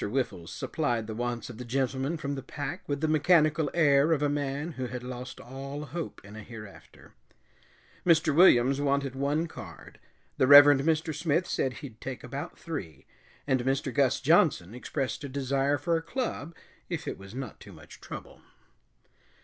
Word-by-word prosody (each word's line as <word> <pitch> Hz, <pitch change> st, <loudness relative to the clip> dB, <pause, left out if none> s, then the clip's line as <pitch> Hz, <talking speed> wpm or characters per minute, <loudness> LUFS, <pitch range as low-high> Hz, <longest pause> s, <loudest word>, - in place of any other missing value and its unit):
Whiffles 110 Hz, -9 st, -2 dB
supplied 120 Hz, -8 st, -2 dB
the 110 Hz, -, -6 dB
wants 120 Hz, 0 st, -3 dB
of 115 Hz, -, -12 dB
the -, -, -5 dB
gentlemen 135 Hz, +5 st, -1 dB
from 145 Hz, -2 st, -3 dB
the 135 Hz, -, -4 dB
pack 145 Hz, +6 st, -5 dB
with 140 Hz, 0 st, -1 dB
the 160 Hz, -, +2 dB
mechanical 155 Hz, -1 st, +3 dB
air 145 Hz, -2 st, +4 dB
of 150 Hz, -2 st, 0 dB
a 145 Hz, -, +2 dB
man 145 Hz, +2 st, -2 dB
who 130 Hz, -4 st, -4 dB
had 125 Hz, 0 st, -6 dB
lost 125 Hz, +1 st, -7 dB
all 135 Hz, +3 st, -7 dB
hope 155 Hz, -, -6 dB
in 100 Hz, +1 st, -11 dB
a 110 Hz, -, -8 dB
hereafter. 105 Hz, -2 st, -12 dB, 0.9 s
Mr. 160 Hz, -3 st, +4 dB
Williams 135 Hz, -5 st, +6 dB
wanted 140 Hz, -2 st, 0 dB
one 140 Hz, +4 st, 0 dB
card, 95 Hz, -, -11 dB, 0.4 s
the 130 Hz, -, +3 dB
Reverend 145 Hz, 0 st, +9 dB
Mr. 160 Hz, +1 st, 0 dB
Smith 160 Hz, +3 st, 0 dB
said 130 Hz, -6 st, -1 dB
he'd 115 Hz, -5 st, -12 dB
take 130 Hz, -1 st, -6 dB
about 135 Hz, +3 st, -6 dB
three, 135 Hz, -, -7 dB, 0.4 s
and 130 Hz, -2 st, +2 dB
Mr. 135 Hz, 0 st, -1 dB
Gus 135 Hz, -1 st, +2 dB
Johnson 140 Hz, -, +3 dB
expressed 130 Hz, +2 st, -3 dB
a 140 Hz, -, -5 dB
desire 140 Hz, +1 st, 0 dB
for 165 Hz, +4 st, 0 dB
a -, -, -3 dB
club, 170 Hz, -, -4 dB, 0.3 s
if -, -, -4 dB
it -, -, -4 dB
was 95 Hz, +3 st, -11 dB
not 130 Hz, -5 st, -6 dB
too -, -, -12 dB
much -, -, -14 dB
trouble. -, -, -9 dB
140 Hz, 175 wpm, -28 LUFS, 125-155 Hz, 0.9 s, Reverend